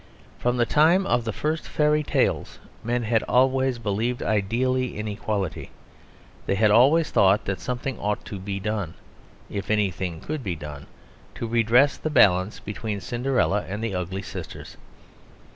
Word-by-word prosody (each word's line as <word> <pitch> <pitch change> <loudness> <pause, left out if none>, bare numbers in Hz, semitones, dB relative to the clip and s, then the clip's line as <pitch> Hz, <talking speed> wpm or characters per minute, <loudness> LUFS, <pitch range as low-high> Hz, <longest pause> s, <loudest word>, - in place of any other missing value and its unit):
From 120 +1 0
the 120 - +3
time 165 +9 +4
of 120 -10 +1
the 115 - -1
first 155 +8 -2
fairy 150 0 +2
tales 150 - 0 0.3
men 120 +1 -1
had 110 0 +2
always 130 0 +3
believed 115 +2 -2
ideally 120 +5 0
in 105 +1 -4
equality; 100 -3 -3 0.8
they 95 - +1
had 105 +1 +3
always 140 +9 +5
thought 100 +1 +4
that 95 -2 -2
something 125 0 -4
ought 105 0 -2
to 100 - -6
be 100 +1 -4
done, 105 -4 -3 0.5
if 100 -1 -5
anything 95 -5 -1
could 155 - -5
be 95 -5 -2
done, 75 -2 -9 0.5
to - - -4
redress 120 +4 +3
the 155 - -3
balance 100 -8 +4
between 105 0 -5
Cinderella 120 -1 0
and 105 +4 -4
the 115 -3 -2
ugly 95 +2 -3
sisters. - - -8
110 Hz, 155 wpm, -24 LUFS, 100-130 Hz, 0.8 s, always